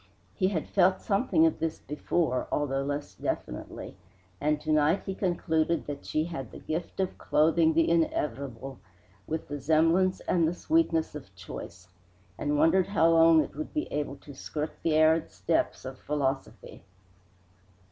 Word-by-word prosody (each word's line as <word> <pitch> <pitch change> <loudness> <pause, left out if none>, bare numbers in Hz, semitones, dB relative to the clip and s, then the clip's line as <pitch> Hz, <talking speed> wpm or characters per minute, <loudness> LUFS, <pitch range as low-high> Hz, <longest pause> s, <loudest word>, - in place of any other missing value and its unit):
He 185 - +1
had 180 -5 -2
felt 185 +1 +3
something 255 +10 +2
of 325 - +1
this 165 -1 -2
before, 150 -2 -1
although 135 -2 0
less 145 +1 -4
definitely, - - -5 0.4
and 150 0 +1
to 155 +1 -3
night 155 +5 +3
he 195 - -3
concluded 170 -3 0
that 145 -1 -7
she 155 +1 0
had 135 -8 -6
the - - -11
gift 165 +4 -5
of 190 -1 -2
clothing 160 +1 +3
the 165 0 +4
inevitable 135 -5 -1 0.5
with 160 +1 -3
the 145 0 -5
semblance 165 +5 +3
and 170 -3 +2
the 170 - -2
sweetness 245 - +1
of 130 -11 -10
choice; 90 -1 -9 0.5
and 145 0 -1
wondered 175 +5 +4
how 165 -5 +3
long 165 -1 +6
it - - -10
would 310 - -6
be 305 - 0
able 145 -1 -2
to 145 - -13
skirt 150 +3 -4
the 160 -2 +1
arid 160 +1 +4
steppes 165 - -1
of 130 0 -7
philosophy. 135 -2 -3
160 Hz, 155 wpm, -28 LUFS, 145-170 Hz, 0.5 s, long